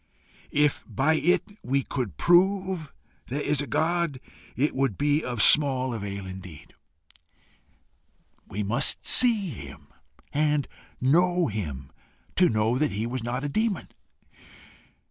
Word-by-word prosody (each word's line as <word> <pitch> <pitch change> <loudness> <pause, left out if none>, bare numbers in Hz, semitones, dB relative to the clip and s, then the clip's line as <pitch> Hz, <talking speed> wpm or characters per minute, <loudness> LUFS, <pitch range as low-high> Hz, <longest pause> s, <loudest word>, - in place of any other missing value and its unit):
If 150 -1 +2
by 140 +4 +1
it 170 +3 +2 0.2
we 135 +2 0
could 125 -7 -4
prove 185 -2 +2 0.4
there 135 +4 -3
is 145 -1 +1
a 145 - -5
God, 165 -3 0 0.4
it 145 +5 0
would 130 -7 -1
be 145 +1 +1
of 120 -3 0
small 130 -4 +3
avail 100 -3 -5
indeed: 95 -4 -10 1.7
we 105 +2 -4
must 105 +4 0
see 225 -7 +5
him 115 - -11 0.4
and 150 -1 +1 0.3
know 175 +6 +3
him, 75 -11 -5 0.4
to 180 - +4
know 110 +3 +1
that 150 -5 0
he 105 +3 -2
was 125 +1 -4
not 125 +3 -3
a - - -1
demon. 215 +7 -1
140 Hz, 125 wpm, -26 LUFS, 115-160 Hz, 1.7 s, see